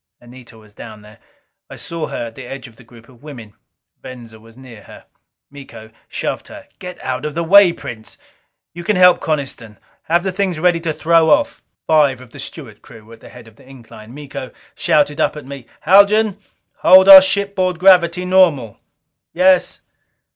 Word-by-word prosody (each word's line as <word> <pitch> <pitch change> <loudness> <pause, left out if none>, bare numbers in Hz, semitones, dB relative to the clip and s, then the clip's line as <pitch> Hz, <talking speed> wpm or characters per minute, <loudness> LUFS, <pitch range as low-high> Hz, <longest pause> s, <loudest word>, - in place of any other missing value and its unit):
Anita 120 -1 -17
was 110 -2 -21
down 110 -1 -13
there. 105 +2 -18 0.5
I - - -11
saw 165 -2 -7
her - - -6
at 115 - -10
the 130 +1 -12
edge 135 +1 -9
of 115 - -19
the 125 - -19
group 115 0 -19
of 125 -2 -22
women. 125 -8 -12 0.5
Venza 115 -3 -13
was 115 +2 -20
near 125 -5 -15
her. - - -16 0.5
Miko 135 -6 -14 0.2
shoved - - -6
her. - - -14
"Get 180 0 -10
out 130 +1 -5
of 150 -1 -6
the 170 - -2
way, 195 +2 +5
Prince. 110 -9 -11 0.6
You 175 +1 -10
can 210 +4 -1
help 180 -1 +4
Coniston. 130 -8 -6 0.3
Have 170 +1 0
the 190 - -3
things 185 -3 -3
ready 175 0 +1
to 165 -1 -4
throw 165 +1 +1
off." - - 0 0.2
Five 145 -5 +1
of 125 -2 -16
the - - -14
steward - - -11
crew 110 -2 -17
were 115 - -16
at 115 - -16
the - - -16
head 125 -2 -15
of 110 -1 -20
the 130 - -21
incline. 115 -4 -15
Miko 140 -3 -9 0.2
shouted 145 -1 -1
up - - -1
at 150 - -10
me: 135 -3 -11
"Haljan, 200 +3 +3 0.4
hold 190 +1 +5
our 195 -1 +11
shipboard 190 -2 -2
gravity 180 -1 +3
normal." 170 - +1 0.5
"Yes." 185 +1 +1
145 Hz, 185 wpm, -16 LUFS, 120-180 Hz, 0.6 s, our